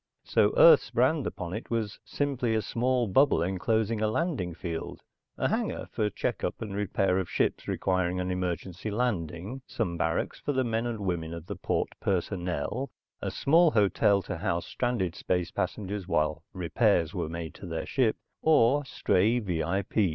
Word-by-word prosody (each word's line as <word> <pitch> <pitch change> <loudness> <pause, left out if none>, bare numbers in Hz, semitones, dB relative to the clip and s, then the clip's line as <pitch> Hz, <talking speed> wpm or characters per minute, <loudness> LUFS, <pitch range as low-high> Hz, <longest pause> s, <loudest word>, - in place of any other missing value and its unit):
So - - +3
Earth's - - +8
brand 155 -4 +2
upon 90 -1 -5
it 110 - -6
was 110 -3 -2
simply 130 -5 -1
a 110 - +1
small 125 +1 +1
bubble 120 - +4
enclosing 110 +4 0
a 110 - +3
landing 110 - -1
field, 85 -2 -5 0.3
a - - +1
hangar - - -2
for 105 - 0
checkup - - -2
and 105 -3 -5
repair 95 -2 +1
of 95 - -3
ships - - 0
requiring 90 -1 0
an 90 0 -1
emergency 90 +2 -3
landing, 105 - -2
some 90 -7 -2
barracks 85 -1 -1
for 145 - -2
the 130 -1 +2
men 115 0 -1
and 115 -3 -4
women 85 -4 -2
of 85 -1 -8
the - - -5
port - - -1
personnel, 95 - -2 0.3
a - - -2
small 165 +4 +4
hotel 100 - +3
to 90 - -4
house 85 0 -1
stranded 120 -9 -1
space 90 -2 -1
passengers 100 -2 -3
while 80 -2 +1
repairs 90 -1 +1
were - - -2
made 85 -1 -5
to 95 - -10
their 80 -1 -3
ship, 125 -5 +1 0.2
or 145 -2 +4
stray 110 -2 +2
V.I. 95 -3 -1
100 Hz, 165 wpm, -28 LUFS, 85-120 Hz, 0.3 s, Earth's